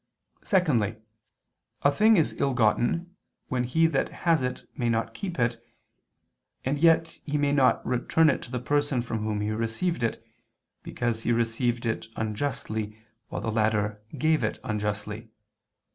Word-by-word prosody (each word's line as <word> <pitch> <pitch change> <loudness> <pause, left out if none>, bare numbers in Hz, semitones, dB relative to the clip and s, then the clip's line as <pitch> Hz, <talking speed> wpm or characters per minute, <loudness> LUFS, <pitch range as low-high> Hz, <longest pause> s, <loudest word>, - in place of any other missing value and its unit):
Secondly, 140 - +2 0.9
a 140 - +5
thing 215 +7 +5
is 160 - +2
ill 135 -2 +1
gotten, 125 - +1 0.3
when 125 -1 0
he 160 +7 +3
that 155 -4 +1 0.2
has 165 -3 +4
it 125 0 -3
may 120 -1 0
not 115 0 0
keep 180 - -5
it, 115 -1 0 1.0
and 140 +2 0
yet 165 0 +3
he 150 0 -1
may 145 -1 +2
not 135 -3 +3
return 125 +6 +2
it 140 - +2
to - - -9
the 125 - -2
person 145 0 0
from 115 -2 -3
whom 105 -1 -2
he 105 +1 -1
received 115 +11 -1
it, 115 - -2 0.6
because 120 -2 -2
he 120 - 0
received 120 +1 0
it 115 - -2
unjustly, 110 -2 -3 0.3
while - - -4
the 110 - -2
latter 105 -1 +1 0.2
gave 155 +3 +2
it - - -1
unjustly. 105 0 -3
120 Hz, 155 wpm, -27 LUFS, 110-145 Hz, 1.0 s, a